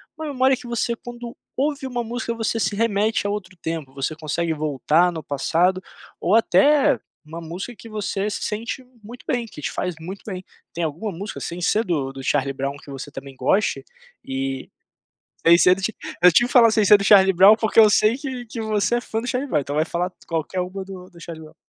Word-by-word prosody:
uma 315 0 -6
memória 265 -2 +2
que 255 -1 -11
você 235 0 -1
quando 240 0 -9 0.2
ouve 280 -1 -1
uma 245 -2 -3
música 235 +1 -3
você 225 0 -1
se 205 - 0
remete 215 -1 +1
a 205 - 0
outro 190 -3 -5
tempo, 160 -5 -5
você 135 +3 -3
consegue 160 +2 -2
voltar 155 +3 +2
no 160 -2 -6
passado, 170 +7 +1 0.4
ou 185 +5 +2
até 275 +6 +4 0.3
uma 165 +2 -8
música 180 +9 -7
que 230 - -12
você 210 -1 -2
se - - -4
sente 230 +4 -4 0.2
muito 240 +4 -12
bem, 240 -2 -1
que 150 - -11
te - - -2
faz 180 -2 -3
muito 185 +5 -8
bem. 185 -3 -6 0.3
Tem 170 - -3
alguma 165 +7 -3
música 200 +5 -6
sem 170 +1 -5
ser 210 +5 +1
do 145 - -1
do 135 0 -8
Charlie 140 0 0
Brown 135 +1 -3
que 140 - -13
você 135 +2 -7
também 135 -1 -9
goste? 165 +11 +1 0.4
E, 135 0 -4 0.8
sem 170 +1 +8
ser 180 +1 +5
do 195 - -8
ti 220 +4 -2 0.3
eu 180 0 +8
tive 240 +9 +4
que - - -10
falar 235 -3 +7
sem 220 -1 +3
ser 205 +1 +8
do 200 - -4
Charlie 195 -1 +6
Brown, 195 +4 +8
porque 220 0 +2
eu 215 -1 +8
sei 215 +2 +4
que 260 -4 -6
que 225 +1 -6
você 215 +1 0
é 240 - 0
fã 220 -1 -3
do 245 - -6
Charlie 265 +3 -1
Brown, 150 - +1
então 140 +1 -5
vai 155 +1 +2
falar 175 +2 -2
t - - -25
qualquer 165 +3 -2
um 180 - -4
do 190 -1 -8
do 175 -3 -17
Charlie 165 -1 -8
Brown. 155 - -17
195 Hz, 225 wpm, -22 LUFS, 165-230 Hz, 0.8 s, sem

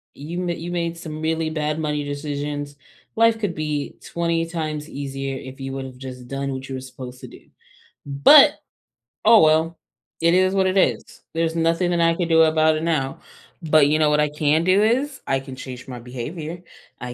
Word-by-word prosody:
You 165 +6 -5
m 175 - -2
you 170 +1 -4
made 170 -1 -2
some 155 -2 -7
really 160 0 -1
bad 155 0 -2
money 150 -1 -1
decisions. 145 0 -4 0.4
Life 225 0 +3
could 200 -6 -2
be 150 -2 -3
20 170 -1 -1
times 155 -2 -4
easier 135 -1 -5
if 130 +1 -10
you 135 0 -5
would've 130 -1 -7
just 125 -2 -9
done 140 +1 -3
what 130 0 -6
you 135 - -4
were 130 - -5
supposed 125 -1 -10
to - - -8
do. - - -14 0.6
But! 140 0 +7 0.7
Oh, 225 -1 +8
well, 160 +1 +3 0.4
it 170 +1 +4
is 185 +1 +3
what 190 -1 +3
it 185 +1 0
is. - - +2 0.3
There's 165 0 -1
nothing 165 +2 +1
that 170 -1 +1
I 165 0 +3
can 175 -2 -1
do 160 -1 +5
about 155 0 +3
it 155 - -4
now, 150 -5 -1 0.4
but 155 -3 +4
you 155 +1 +2
know 150 -1 +4
what 150 0 +2
I 150 - +1
can 150 +2 +1
do 185 +3 +4
is 265 +5 0
I 135 0 +1
can 135 -1 -9
change 130 -1 -9
my 125 -2 -7
behavior, 150 +8 -6 0.4
I 125 -1 -5
155 Hz, 200 wpm, -22 LUFS, 140-170 Hz, 0.7 s, Oh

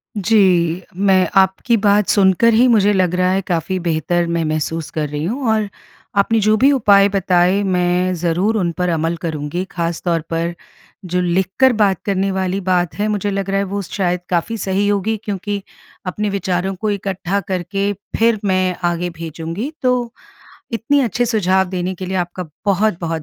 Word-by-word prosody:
जी। 185 -5 +2
मैं 190 -1 +3
आपकी 190 +5 +3
बात 205 -1 +3
सुनकर 200 +3 +4
ही 240 +3 +5
मुझे 210 -4 +4
लग 180 -2 +1
रहा 185 0 +2
है 195 - +1
काफ़ी 175 +1 -1
बेहतर 170 0 0
मैं 170 -1 -1
महसूस 155 +1 -2
कर 150 -2 -2
रही 150 +1 -4
हूँ। 240 +7 -2
और 215 -1 +1 0.5
आपने 220 +3 +3
जो 215 +1 +3
भी 275 +4 +5
उपाय 205 -6 +5
बताए 185 0 +2
मैं 180 -1 +1
ज़रूर 180 +6 0
उन 175 -4 0
पर 180 0 0
अमल 165 0 -1
करूँगी 155 +2 -3
ख़ास 170 -1 -3
तौर 165 -2 +1
पर 165 +1 -1 0.5
जो 180 +1 -1
लिखकर 190 +9 +2
बात 200 -4 +1
करने 195 -1 0
वाली 190 0 -1
बात 180 -2 0
है 210 - +1
मुझे 205 -1 -1
लग 195 0 -3
रहा 195 - +1
है - - +1
वो 200 +1 -3
शायद 180 -1 -2
काफ़ी 185 +6 -1
सही 195 +1 0
होगी 205 +2 0
क्योंकि 205 0 -3 0.4
अपने 210 +3 -2
विचारों 190 -1 -1
को 215 +3 -2
इकट्ठा 195 -1 -2
करके 195 +2 -1 0.3
फिर 230 -1 +3
मैं 185 -1 +1
आगे 175 +1 -2
भेजूँगी। 165 - -5
तो 250 -1 +3 0.8
इतनी 280 +6 +1
अच्छे 245 -1 0
सुझाव 190 -5 +2
देने 185 0 -3
के 185 +1 -7
लिए 190 - -2
आपका 175 -1 -3 0.2
बहुत-बहुत 175 -5 0
190 Hz, 175 wpm, -18 LUFS, 175-205 Hz, 0.8 s, ही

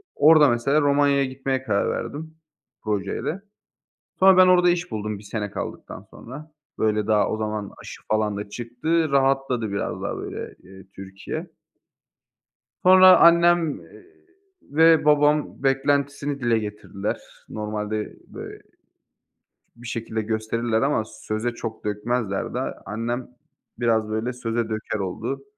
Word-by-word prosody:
orada 150 -2 +6
mesela 135 +6 +2
Romanya'ya 140 -1 +3
gitmeye 130 0 -3
karar 100 -5 0
verdim, 160 +2 -5 0.5
projeyle. 105 - -3 0.8
Sonra 190 0 +7
ben 185 0 +7
orada 180 -1 +5
iş 175 0 -2
buldum, 105 -1 -4
1 105 - -14
sene 105 0 -4
kaldıktan - - -7
sonra. 150 +6 -11 0.3
Böyle, 105 -1 +1
daha 105 -1 +2
o 110 - -1
zaman 105 -2 -4
aşı - - -10
falan 105 -1 0
da 105 0 -6
çıktı, 130 +9 -1
rahatladı 135 -4 +1
biraz 100 - -3
daha - - -3
böyle, - - -7 0.3
ııı, 95 0 -14
Türkiye. 95 - -7 1.4
Sonra 185 0 +8
annem, 170 -2 +4
eee - - -16 0.6
ve 160 +1 +4
babam 150 -2 +2
beklentisini 140 +1 0
dile 120 -2 +2
getirdiler. 105 -1 -5 0.3
Normalde 105 0 -4
bö - - -9 1.2
bir 120 +1 -12
şekilde 115 -1 -3
gösterirler 110 +1 -1
ama 135 -5 +1
söze 110 +2 -4
çok 115 -2 -7
dökmezler 105 0 -2
de - - -1 0.3
annem 115 +4 -3 0.5
biraz, 115 -3 +1
böyle, 110 +3 -2
söze 115 -2 -3
döker 110 -1 -3
oldu. 115 +8 -4
120 Hz, 125 wpm, -23 LUFS, 110-145 Hz, 1.4 s, Sonra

